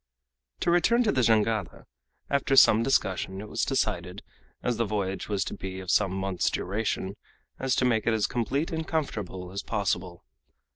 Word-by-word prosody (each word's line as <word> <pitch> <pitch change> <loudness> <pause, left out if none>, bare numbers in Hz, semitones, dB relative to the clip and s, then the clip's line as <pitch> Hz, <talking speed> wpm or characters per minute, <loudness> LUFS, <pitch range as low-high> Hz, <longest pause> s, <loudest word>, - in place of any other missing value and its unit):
To - - +2
return 230 +8 +4
to 215 - +2
the 130 - +1
Jangada. 110 -4 +1 0.4
After 140 0 +1
some 110 -4 +7
discussion 95 -7 0
it 105 - -7
was - - -2
decided, 95 -8 -1 0.4
as 120 -2 0
the 115 - +2
voyage 100 -3 -3
was 100 -2 0
to - - -5
be 95 -1 -6
of 95 -2 -3
some 100 -3 +3
months' 95 -1 0
duration, 100 0 -2 0.5
to 130 -1 +2
make 115 -3 +1
it 115 - +4
as 110 - +1
complete 135 +6 -1
and 160 -1 -3
comfortable 100 - -3
as 100 - -4
possible. 95 -4 -2
105 Hz, 165 wpm, -27 LUFS, 95-130 Hz, 0.5 s, some